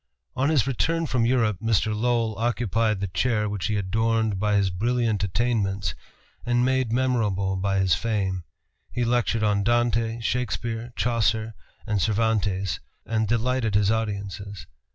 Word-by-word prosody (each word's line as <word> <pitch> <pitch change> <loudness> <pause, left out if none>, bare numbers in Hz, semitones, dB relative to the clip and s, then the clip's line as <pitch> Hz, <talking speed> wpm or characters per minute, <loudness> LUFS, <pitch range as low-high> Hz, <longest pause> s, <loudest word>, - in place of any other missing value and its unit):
On 130 +3 +1
his 145 -7 +3
return 165 +6 0
from 120 -4 +1
Europe, 115 -5 +2
Mr. 110 -1 +1
Lowell 115 -1 0
occupied 115 -3 0
the 100 - -1
chair 105 +3 0
which 100 -1 -2
he 110 - -1
adorned 110 +1 0
by 105 0 +1
his 100 -2 +2
brilliant 115 +1 0
attainments 100 - 0 0.5
and 120 +1 +2
made 130 -3 +1
memorable 110 -7 +1
by 95 +1 0
his 95 -3 +3
fame. 95 -2 -1 0.5
He 120 -1 -1
lectured 115 -2 +1
on 105 -1 +2
Dante, 115 0 +1
Shakespeare, 120 -1 -2
Chaucer, 115 -2 +1 0.3
and 105 -3 0
Cervantes, 100 -5 0 0.3
and 110 -1 0
delighted 120 -1 0
his 105 0 +3
audiences. 100 -3 -3
110 Hz, 140 wpm, -25 LUFS, 100-120 Hz, 0.5 s, his